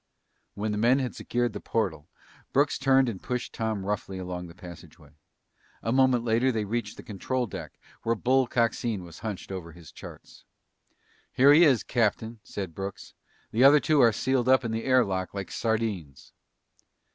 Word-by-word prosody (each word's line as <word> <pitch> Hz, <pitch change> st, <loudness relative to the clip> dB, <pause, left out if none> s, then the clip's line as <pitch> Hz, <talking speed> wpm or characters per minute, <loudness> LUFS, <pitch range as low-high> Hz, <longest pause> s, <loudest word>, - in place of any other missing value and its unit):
When 105 Hz, +1 st, -2 dB
the 105 Hz, -, -2 dB
men 120 Hz, +4 st, +4 dB
had 130 Hz, -3 st, -3 dB
secured 120 Hz, -2 st, -1 dB
the 105 Hz, -, -5 dB
portal, 90 Hz, -12 st, -2 dB, 0.4 s
Brooks 140 Hz, +2 st, +2 dB
turned 135 Hz, -1 st, +4 dB
and 105 Hz, -6 st, -4 dB
pushed 125 Hz, -1 st, -4 dB
Tom 110 Hz, -4 st, -3 dB
roughly 100 Hz, -2 st, -3 dB
along 90 Hz, -1 st, -5 dB
the 85 Hz, -, -14 dB
passageway. 90 Hz, -3 st, -13 dB, 0.7 s
A 115 Hz, -, -1 dB
moment 130 Hz, -2 st, +3 dB
later 120 Hz, +3 st, +2 dB
they 110 Hz, -3 st, -2 dB
reached 110 Hz, 0 st, -3 dB
the -, -, -10 dB
control 125 Hz, +5 st, -2 dB
deck 105 Hz, -, -8 dB, 0.2 s
where 115 Hz, +1 st, 0 dB
Bull 130 Hz, +3 st, +2 dB
Coxine 115 Hz, -4 st, 0 dB
was 85 Hz, -2 st, -12 dB
hunched 105 Hz, -3 st, -6 dB
over 85 Hz, -3 st, -7 dB
his 85 Hz, -1 st, -14 dB
charts. -, -, -13 dB, 0.9 s
"Here 140 Hz, +3 st, +6 dB
he 165 Hz, +3 st, +7 dB
is, 130 Hz, -7 st, +3 dB
Captain," 115 Hz, -1 st, -1 dB
said 95 Hz, -4 st, -6 dB
Brooks. 95 Hz, +2 st, -7 dB, 0.4 s
"The 115 Hz, +4 st, +2 dB
other 145 Hz, +2 st, +8 dB
two 150 Hz, -1 st, +3 dB
are 115 Hz, -2 st, +6 dB
sealed 130 Hz, +3 st, 0 dB
up 130 Hz, -1 st, +4 dB
in 115 Hz, -, -2 dB
the 115 Hz, 0 st, -3 dB
air 130 Hz, -2 st, +4 dB
lock 95 Hz, 0 st, -3 dB
like 100 Hz, -1 st, -5 dB
sardines!" 110 Hz, -, -3 dB
115 Hz, 175 wpm, -27 LUFS, 95-125 Hz, 0.9 s, other